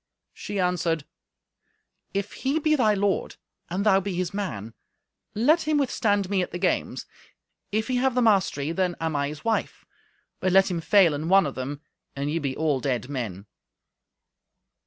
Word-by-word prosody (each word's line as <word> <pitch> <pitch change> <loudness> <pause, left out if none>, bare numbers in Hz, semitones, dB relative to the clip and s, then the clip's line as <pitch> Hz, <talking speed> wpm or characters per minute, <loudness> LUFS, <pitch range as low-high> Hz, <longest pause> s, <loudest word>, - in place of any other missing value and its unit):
She 205 -1 -5
answered, 175 -4 0 1.1
"If 200 +1 -3
he 270 +3 -1
be 310 0 +2
thy 220 -7 +3
lord, 200 0 0 0.3
and 190 +4 -2
thou 195 -2 +5
be 195 -1 -4
his 180 0 -2
man, 115 - -4 0.6
let 305 +9 +3
him 310 -1 +3
withstand 205 -8 +1
me 195 -1 +1
at 180 - -2
the 175 - -5
games. 180 0 -1 0.7
If 215 +2 0
he 255 -1 0
have 260 0 +1
the 250 - +3
mastery, 185 -9 +2
then 180 0 0
I 165 - -2
am 145 -3 0
his 150 +5 -9
wife, 225 -1 -1 0.5
but 185 - 0
let 195 0 +5
him 170 -2 -2
fail 180 -1 +5
in 155 +3 -3
one 195 0 +6
of 140 - -3
them, 140 +3 -5 0.3
and 140 +1 -2
ye 165 - 0
be 140 -4 -3
all 150 -4 +1
dead 130 -1 -2
men." 110 -8 -4
185 Hz, 175 wpm, -25 LUFS, 150-205 Hz, 1.1 s, one